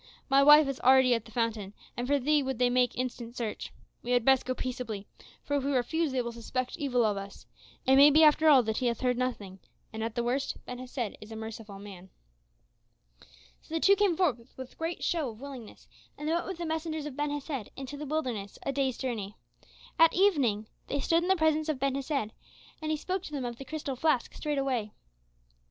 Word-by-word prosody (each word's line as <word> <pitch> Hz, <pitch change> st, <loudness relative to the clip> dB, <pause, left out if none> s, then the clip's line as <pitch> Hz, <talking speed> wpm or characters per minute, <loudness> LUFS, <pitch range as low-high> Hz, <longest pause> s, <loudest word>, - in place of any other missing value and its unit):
"My 275 Hz, 0 st, +5 dB
wife 295 Hz, +1 st, +8 dB
is 275 Hz, -1 st, -3 dB
already 260 Hz, 0 st, +5 dB
at 230 Hz, -1 st, -1 dB
the 225 Hz, -, -14 dB
fountain, 220 Hz, -3 st, -2 dB, 0.2 s
and 245 Hz, +1 st, -3 dB
for 285 Hz, +1 st, +3 dB
thee 295 Hz, +3 st, +2 dB
would 265 Hz, -2 st, -3 dB
they 250 Hz, 0 st, +2 dB
make 250 Hz, -2 st, +2 dB
instant 245 Hz, -1 st, -4 dB
search. 225 Hz, -3 st, -4 dB, 0.3 s
We 245 Hz, -, -2 dB
had 245 Hz, -2 st, +2 dB
best 265 Hz, -1 st, +4 dB
go 255 Hz, -, -1 dB
peaceably, 240 Hz, -6 st, -4 dB, 0.4 s
for 285 Hz, -, -2 dB
if 275 Hz, -, -2 dB
we 280 Hz, +1 st, 0 dB
refuse 295 Hz, +5 st, 0 dB
they 255 Hz, -1 st, 0 dB
will 235 Hz, -, -4 dB
suspect 245 Hz, +2 st, -4 dB
evil 250 Hz, -5 st, +1 dB
of 210 Hz, -2 st, 0 dB
us 195 Hz, 0 st, -8 dB, 0.4 s
It 265 Hz, +1 st, +5 dB
may 285 Hz, +2 st, +9 dB
be 310 Hz, +2 st, +6 dB
after 310 Hz, +1 st, +6 dB
all 270 Hz, -4 st, +7 dB
that 220 Hz, -1 st, -2 dB
he 255 Hz, -, 0 dB
hath 235 Hz, -1 st, -1 dB
heard 250 Hz, -1 st, +2 dB
nothing; 205 Hz, -7 st, -3 dB, 0.3 s
and 220 Hz, 0 st, -4 dB
at 225 Hz, 0 st, -4 dB
the 240 Hz, -, 0 dB
worst, 260 Hz, +3 st, -1 dB
Ben 250 Hz, 0 st, -7 dB
Hesed 250 Hz, -4 st, -5 dB
is 215 Hz, +1 st, -11 dB
a -, -, -6 dB
merciful 220 Hz, -2 st, -8 dB
man." 195 Hz, -2 st, -11 dB, 1.5 s
So 320 Hz, -, -8 dB
the -, -, +1 dB
two 395 Hz, +4 st, +5 dB
came 395 Hz, -5 st, +2 dB
forth 260 Hz, -10 st, -1 dB
with 260 Hz, -1 st, -9 dB
great 325 Hz, +1 st, -4 dB
show 320 Hz, -6 st, 0 dB
of 220 Hz, -1 st, -11 dB
willingness, 265 Hz, -5 st, -10 dB, 0.3 s
and 295 Hz, -, -5 dB
they 320 Hz, -, +1 dB
went 345 Hz, -, -1 dB
with 375 Hz, -2 st, -5 dB
the 340 Hz, -, -4 dB
messengers 315 Hz, -1 st, -3 dB
of 295 Hz, -3 st, -6 dB
Ben 295 Hz, +1 st, -1 dB
Hesed 285 Hz, -5 st, -4 dB
into 270 Hz, +1 st, -7 dB
the 295 Hz, +1 st, -6 dB
wilderness 250 Hz, -10 st, -3 dB
a -, -, 0 dB
day's 270 Hz, -2 st, -1 dB
journey. 220 Hz, -6 st, -4 dB, 0.6 s
At 330 Hz, 0 st, +6 dB
evening 280 Hz, -, +2 dB, 0.2 s
they 280 Hz, -, -2 dB
stood 330 Hz, +4 st, +2 dB
in 355 Hz, -, -2 dB
the 380 Hz, -, +5 dB
presence 315 Hz, -2 st, +1 dB
of 305 Hz, -, 0 dB
Ben 275 Hz, +1 st, 0 dB
Hesed, 275 Hz, -5 st, -2 dB, 0.5 s
and 310 Hz, -, -3 dB
he 310 Hz, -, +1 dB
spoke 370 Hz, +5 st, -3 dB
to -, -, -8 dB
them 275 Hz, -4 st, -3 dB
of 240 Hz, -1 st, -5 dB
the 270 Hz, -, -7 dB
crystal 290 Hz, -1 st, -4 dB
flask 265 Hz, -2 st, +1 dB
straightway. 270 Hz, -7 st, -2 dB
260 Hz, 220 wpm, -29 LUFS, 235-300 Hz, 1.5 s, may